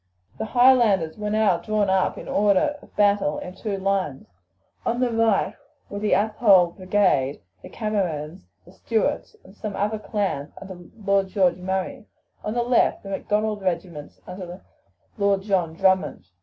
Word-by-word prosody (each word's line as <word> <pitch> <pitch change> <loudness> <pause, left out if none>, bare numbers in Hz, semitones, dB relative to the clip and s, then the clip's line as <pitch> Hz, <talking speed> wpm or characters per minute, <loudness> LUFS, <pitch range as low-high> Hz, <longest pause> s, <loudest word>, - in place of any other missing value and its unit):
The - - -2
Highlanders 230 -9 +4
were 210 0 -2
now 210 -5 +2
drawn 215 -2 0
up 190 -1 +1
in - - -9
order 210 +8 +2
of - - -19
battle 200 -1 +2
in 180 - -7
two 205 0 -4
lines. 190 -8 -1 0.6
On 235 +1 -1
the 250 -1 +1
right 225 -3 +2 0.4
were 200 - -4
the 210 0 +1
Athole 205 -4 +4
brigade, 185 -8 +1 0.2
the - - -11
Camerons, 175 - -3 0.2
the 180 - -16
Stuarts, 220 +3 -2
and 190 - -17
some 210 -1 -5
other 210 +2 -1
clans 195 -10 -3
under 185 -3 -11 0.2
Lord 200 -1 +2
George 185 -3 +2
Murray; 190 +7 -4 0.4
on 215 - -3
the 240 - +1
left 245 0 +2
the 195 - -8
Macdonald 210 +1 -1
regiments 170 -5 -4
under 180 0 -8 0.6
Lord 200 -1 +2
John 180 -6 0
Drummond. 190 - +1
195 Hz, 155 wpm, -24 LUFS, 185-215 Hz, 0.6 s, Highlanders